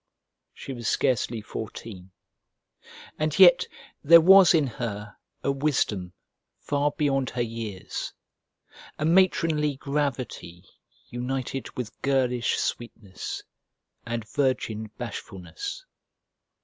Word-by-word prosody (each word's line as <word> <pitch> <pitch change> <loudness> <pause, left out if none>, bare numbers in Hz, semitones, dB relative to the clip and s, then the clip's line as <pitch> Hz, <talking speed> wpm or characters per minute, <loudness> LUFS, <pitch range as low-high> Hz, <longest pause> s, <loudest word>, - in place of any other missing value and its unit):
She 135 - -7
was 120 -3 -5
scarcely 115 -2 +1
fourteen, 105 -3 -8 1.1
and 155 -1 0
yet 180 -2 +7 0.4
there 170 +3 +9
was 185 +1 +7
in 155 -3 +3
her 105 -4 -5 0.3
a 140 - +2
wisdom 125 -11 -1 0.4
far 145 0 0
beyond 135 -3 0
her 120 -1 -1
years, 110 -5 -5 0.9
a 150 - -1
matronly 165 -4 +3
gravity 130 - -3 0.4
united 130 +1 -4
with 125 -3 -6
girlish 125 -3 +1
sweetness 110 -5 -5 0.6
and 115 -1 -4
virgin 110 -6 -1
bashfulness. 120 - -7
130 Hz, 95 wpm, -26 LUFS, 110-150 Hz, 1.1 s, there